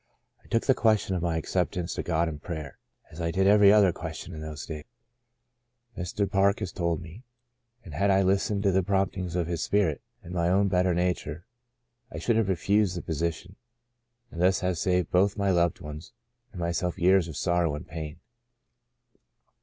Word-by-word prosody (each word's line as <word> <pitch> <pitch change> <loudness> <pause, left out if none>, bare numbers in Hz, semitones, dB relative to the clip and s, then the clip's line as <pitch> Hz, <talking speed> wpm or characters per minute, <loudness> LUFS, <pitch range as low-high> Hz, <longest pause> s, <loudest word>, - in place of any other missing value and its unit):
" - - -42
I - - -21
took 115 - 0
the 135 - +5
question 110 -5 +2
of 90 - -2
my 85 -1 0
acceptance 90 +1 -2
to - - -3
God 85 0 0
in 75 -2 -5
prayer, 80 -4 -7 0.3
as 80 - -8
I 85 - 0
did 95 +3 +1
every 100 0 +7
other 100 -4 +5
question 80 +1 -7
in 80 - -7
those 75 -1 -6
days,'* 75 -2 -7 1.1
Mr. 95 +2 -2
Park 100 +1 +2
has 90 - -4
told 85 -2 -2
me, 85 +7 -11 0.6
"and 80 - -10
had 100 +7 +1
I 95 0 +4
listened 100 +2 +1
to 100 - +3
the 95 +1 +3
promptings 95 -2 -1
of 90 -2 0
His 85 -1 -3
Spirit 100 -7 +1 0.2
and 90 - -9
my 85 -1 +1
own 100 +2 +3
better 90 -1 +2
nature, 90 -2 -2 0.7
I - - -7
should 115 - +1
have 110 -3 +1
re 95 - +2
fused 100 -1 +1
the - - -5
position 85 +3 -3 0.7
and 85 - -5
thus 95 +1 +3 0.2
saved 90 -2 0
both 100 +3 +3
my 100 -1 +1
loved 85 -2 +1
ones 75 +2 -9 0.4
and 95 - -9
myself 85 +1 -1
years 95 -1 +4
of 80 -3 -7
sorrow 85 -4 +1
and 75 - -8
pain. 80 +1 -7
90 Hz, 190 wpm, -27 LUFS, 85-95 Hz, 1.1 s, every